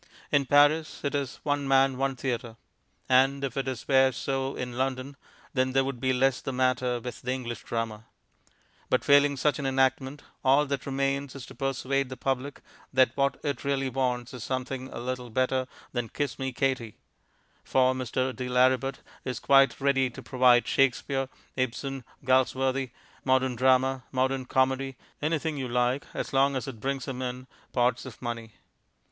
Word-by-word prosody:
In 140 Hz, -2 st, +3 dB
Paris 145 Hz, +3 st, +4 dB
it 140 Hz, -, -1 dB
is 140 Hz, -2 st, -2 dB
"one 145 Hz, -1 st, 0 dB
man, 135 Hz, 0 st, +4 dB
one 135 Hz, +1 st, -1 dB
theatre," 125 Hz, -3 st, -3 dB, 0.5 s
and 135 Hz, +2 st, +4 dB
if 135 Hz, -2 st, -2 dB
it 135 Hz, -1 st, -2 dB, 0.2 s
were 135 Hz, -1 st, +5 dB
so 135 Hz, +2 st, -2 dB
in 125 Hz, -1 st, -5 dB
London 130 Hz, +1 st, -2 dB, 0.4 s
then 130 Hz, -1 st, +1 dB
there 135 Hz, 0 st, +4 dB
would 135 Hz, -2 st, -4 dB
be 130 Hz, +1 st, +1 dB
less 130 Hz, 0 st, +2 dB
the -, -, -3 dB
matter 130 Hz, -1 st, +1 dB
with 120 Hz, -1 st, -7 dB
the 125 Hz, -, -2 dB
English 120 Hz, -3 st, -4 dB
Drama. 115 Hz, -1 st, -3 dB, 0.8 s
But, -, -, +1 dB
failing 145 Hz, 0 st, +5 dB
such 150 Hz, +3 st, +1 dB
an 140 Hz, -, -1 dB
enactment, 135 Hz, +1 st, +1 dB, 0.2 s
all 135 Hz, +3 st, +5 dB
that 140 Hz, -2 st, -3 dB
remains 135 Hz, 0 st, -1 dB
is 135 Hz, -, -7 dB
to -, -, -12 dB
persuade 135 Hz, 0 st, -1 dB
the 130 Hz, -, -7 dB
public 135 Hz, +2 st, -2 dB, 0.3 s
that 130 Hz, -2 st, +4 dB
what 140 Hz, -1 st, +1 dB
it 145 Hz, -2 st, -2 dB
really 135 Hz, -1 st, 0 dB
wants 125 Hz, -2 st, -1 dB
is 125 Hz, -3 st, -7 dB
something 130 Hz, +1 st, -3 dB
a -, -, -7 dB
little 125 Hz, 0 st, -4 dB
better 130 Hz, +2 st, 0 dB, 0.2 s
than 120 Hz, -3 st, -3 dB
Kiss 145 Hz, -3 st, -3 dB
Me, 130 Hz, 0 st, -2 dB
Katie. 125 Hz, -4 st, -1 dB, 0.7 s
For 130 Hz, 0 st, +3 dB
Mr. 130 Hz, 0 st, -2 dB
de 125 Hz, -1 st, -4 dB
Lauributt 130 Hz, +2 st, +2 dB, 0.2 s
is 125 Hz, -2 st, -3 dB
quite 135 Hz, -2 st, +4 dB
ready 135 Hz, -2 st, +2 dB
to 120 Hz, -, -11 dB
provide 125 Hz, -2 st, +4 dB
Shakespeare, 135 Hz, 0 st, +1 dB, 0.3 s
Ibsen, 130 Hz, +1 st, -2 dB, 0.2 s
Galsworthy, 130 Hz, 0 st, +2 dB, 0.3 s
modern 130 Hz, -1 st, +2 dB
drama, 130 Hz, +1 st, +3 dB
modern 130 Hz, 0 st, 0 dB
comedy, 130 Hz, 0 st, +1 dB, 0.2 s
anything 155 Hz, 0 st, -1 dB
you 130 Hz, -2 st, -3 dB
like 125 Hz, +3 st, 0 dB
as -, -, -4 dB
long 135 Hz, +1 st, +3 dB
as 130 Hz, +1 st, -3 dB
it 125 Hz, -5 st, -7 dB
brings 135 Hz, +3 st, -2 dB
him 130 Hz, -1 st, -4 dB
in 125 Hz, 0 st, -4 dB, 0.3 s
pots 125 Hz, +1 st, +1 dB
of 120 Hz, -, -11 dB
money. 115 Hz, -2 st, -5 dB
130 Hz, 170 wpm, -28 LUFS, 125-135 Hz, 0.8 s, were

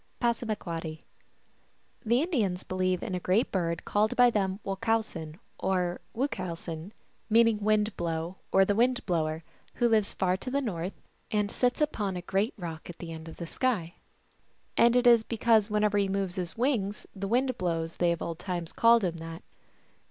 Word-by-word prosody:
(Passamaquoddy.) 190 Hz, -10 st, -2 dB, 1.0 s
The 235 Hz, +5 st, +3 dB
Indians 215 Hz, -, 0 dB
believe 185 Hz, -1 st, -1 dB
in -, -, -4 dB
a 180 Hz, -, -1 dB
great 190 Hz, +7 st, +1 dB
bird 170 Hz, -3 st, -1 dB
called 210 Hz, +1 st, +1 dB
by 245 Hz, -1 st, +6 dB
them 195 Hz, -3 st, 0 dB
Wochowsen 195 Hz, -6 st, -2 dB, 0.2 s
or 180 Hz, -2 st, 0 dB
Wuchowsen, 180 Hz, -, -3 dB, 0.4 s
meaning 225 Hz, -1 st, +5 dB
Wind 210 Hz, 0 st, +1 dB
Blow 170 Hz, +2 st, -3 dB
or 195 Hz, 0 st, +5 dB
the 205 Hz, -, +2 dB
Wind 245 Hz, +4 st, +2 dB
Blower, 160 Hz, -3 st, -1 dB, 0.3 s
who 240 Hz, -, +3 dB
lives 220 Hz, -3 st, +2 dB
far 185 Hz, 0 st, +1 dB
to 255 Hz, -, -6 dB
the 275 Hz, +2 st, +1 dB
North, 190 Hz, -8 st, -4 dB, 0.3 s
and 210 Hz, -1 st, 0 dB
sits 250 Hz, +3 st, +1 dB
upon 205 Hz, -11 st, 0 dB
a 175 Hz, -, -6 dB
great 195 Hz, +6 st, 0 dB
rock 165 Hz, -4 st, -7 dB
at 175 Hz, -, -8 dB
the 170 Hz, -1 st, -7 dB
end 160 Hz, 0 st, -9 dB
of -, -, -11 dB
the 170 Hz, -, -5 dB
sky. 180 Hz, -4 st, -1 dB, 0.8 s
And 235 Hz, +1 st, +5 dB
it 250 Hz, 0 st, +3 dB
is 235 Hz, -2 st, +7 dB
because 225 Hz, -1 st, +2 dB
whenever 210 Hz, -1 st, +2 dB
he 200 Hz, -1 st, +1 dB
moves 195 Hz, -2 st, -1 dB
his 180 Hz, 0 st, -5 dB
wings 225 Hz, -6 st, 0 dB
the 195 Hz, 0 st, -3 dB
wind 255 Hz, +4 st, +1 dB
blows 165 Hz, -2 st, -2 dB
they 175 Hz, -1 st, +3 dB
of 170 Hz, -, -2 dB
old 165 Hz, 0 st, -4 dB
times 175 Hz, -3 st, -4 dB
called 230 Hz, -1 st, +5 dB
him 170 Hz, -2 st, -1 dB
that. 165 Hz, +1 st, -8 dB
195 Hz, 175 wpm, -29 LUFS, 175-225 Hz, 1.0 s, is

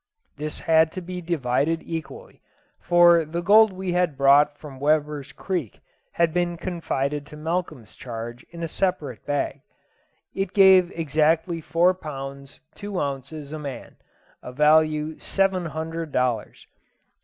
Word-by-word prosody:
This 150 Hz, +1 st, -5 dB
had 160 Hz, 0 st, +3 dB
to 185 Hz, -, -5 dB
be 180 Hz, +1 st, -6 dB
divided 160 Hz, -1 st, 0 dB
equally, 165 Hz, -1 st, -7 dB, 0.4 s
for 175 Hz, -1 st, +5 dB
the 170 Hz, +3 st, -4 dB
gold 215 Hz, +3 st, +6 dB
we 185 Hz, -1 st, -4 dB
had 175 Hz, -5 st, 0 dB
brought 145 Hz, +2 st, +5 dB
from 140 Hz, -4 st, -11 dB
Weber's 150 Hz, -1 st, 0 dB
Creek 165 Hz, -, -4 dB, 0.3 s
had 170 Hz, -2 st, +1 dB
been 175 Hz, -1 st, 0 dB
confided 150 Hz, -5 st, -3 dB
to 150 Hz, -, -11 dB
Malcolm's 160 Hz, -7 st, -4 dB
charge 120 Hz, 0 st, -7 dB
in 170 Hz, 0 st, -8 dB
a -, -, -1 dB
separate 155 Hz, -, -2 dB
bag. 145 Hz, -1 st, -2 dB, 0.7 s
It 195 Hz, -1 st, -3 dB
gave 190 Hz, -3 st, +6 dB
exactly 160 Hz, +2 st, +1 dB
four 170 Hz, +4 st, +2 dB
pounds 140 Hz, -5 st, -8 dB
two 205 Hz, -2 st, -5 dB
ounces 140 Hz, +2 st, -5 dB
a 155 Hz, -, -5 dB
man 140 Hz, -3 st, -8 dB, 0.5 s
value 155 Hz, +3 st, +2 dB
seven 190 Hz, -3 st, 0 dB
hundred 160 Hz, +1 st, -5 dB
dollars. 125 Hz, -4 st, -2 dB
160 Hz, 130 wpm, -24 LUFS, 140-175 Hz, 0.7 s, gold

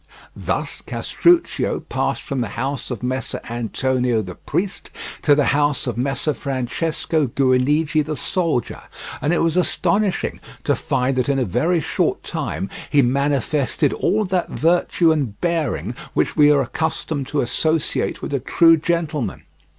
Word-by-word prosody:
Thus -, -, -3 dB
Castruccio 345 Hz, 0 st, +1 dB
passed -, -, -2 dB
from 135 Hz, -4 st, -2 dB
the 120 Hz, -, -1 dB
house 135 Hz, 0 st, -2 dB
of 125 Hz, -2 st, -5 dB
Messer 130 Hz, +1 st, -2 dB
Antonio 120 Hz, 0 st, 0 dB
the 90 Hz, -2 st, -7 dB
priest 190 Hz, -, -3 dB, 0.3 s
to 145 Hz, -, +5 dB
the 145 Hz, -, +3 dB
house 145 Hz, 0 st, +1 dB
of 120 Hz, -, -2 dB
Messer 135 Hz, +5 st, -1 dB
Francesco 145 Hz, +4 st, -1 dB
Guinigi 140 Hz, +5 st, +2 dB
the 155 Hz, +1 st, -4 dB
soldier, 165 Hz, -, -1 dB, 0.4 s
and 145 Hz, -, +1 dB
it 175 Hz, -, +2 dB
was 165 Hz, 0 st, +1 dB
astonishing 195 Hz, +2 st, +1 dB, 0.2 s
to -, -, +2 dB
find 130 Hz, 0 st, 0 dB
that 125 Hz, +1 st, +1 dB
in 140 Hz, -, +2 dB
a 130 Hz, -, +1 dB
very 165 Hz, -, +1 dB
short -, -, -1 dB
time 90 Hz, +6 st, -3 dB, 0.2 s
he 145 Hz, -2 st, +4 dB
manifested 140 Hz, +2 st, +1 dB
all 215 Hz, 0 st, +1 dB
that 185 Hz, -1 st, -1 dB
virtue 170 Hz, 0 st, +2 dB
and 135 Hz, -10 st, -1 dB
bearing 150 Hz, -, -1 dB, 0.2 s
which -, -, +1 dB
we 150 Hz, -1 st, +6 dB
are 140 Hz, -2 st, +4 dB
accustomed 145 Hz, +1 st, -3 dB
to 145 Hz, 0 st, 0 dB
associate 155 Hz, +5 st, 0 dB
with -, -, -4 dB
a 140 Hz, -, +1 dB
true 165 Hz, +5 st, +5 dB
gentleman. 160 Hz, -4 st, -2 dB
145 Hz, 150 wpm, -21 LUFS, 130-165 Hz, 0.4 s, we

